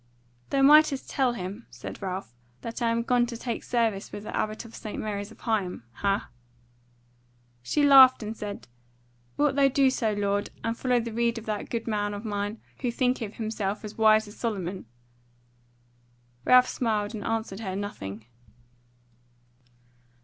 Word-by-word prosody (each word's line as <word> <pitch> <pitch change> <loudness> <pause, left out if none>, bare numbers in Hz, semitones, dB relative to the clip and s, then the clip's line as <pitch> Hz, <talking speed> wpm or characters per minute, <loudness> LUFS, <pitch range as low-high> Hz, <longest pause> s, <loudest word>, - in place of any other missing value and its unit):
"Thou 275 -1 +2
mightest 295 -1 +5
tell 260 -3 +2
him," 200 +2 -6
said - - -9
Ralph, 185 - -4 0.3
"that 230 +1 -6
I 235 - +2
am 230 0 +1
gone 240 0 +2
to 235 -1 -6
take 235 0 -4
service 225 -5 0
with 205 - -7
the 215 - -6
Abbot 215 +1 -2
of 230 - -13
St. 215 - -7
Mary's 205 -1 -3
of - - -14
Higham: 200 - -1
hah?" 200 0 -1 1.3
She 210 - 0
laughed 265 -4 +8
and 215 +1 -5
said: 205 - -7 0.7
"Wilt 290 -2 +2
thou 280 -1 +5
do 270 0 +3
so, 225 -4 0
lord, 205 0 0
and 230 0 -1
follow 250 0 +1
the 230 -1 -4
rede 235 0 +1
of 230 - -7
that 210 -1 -3
goodman 210 -3 -2
of 205 +3 -7
mine, 205 +1 -3 0.2
who 250 - -1
thinketh 245 -3 -1
himself 215 -2 -3
as 210 - -8
wise 220 -1 +4
as 205 - -12
Solomon?" 190 - -3 1.6
Ralph 250 0 +7
smiled 215 -3 -1
and 210 -2 -5
answered 220 -3 -2
her 190 -4 -4
nothing. 110 - -6
220 Hz, 155 wpm, -27 LUFS, 205-240 Hz, 1.6 s, laughed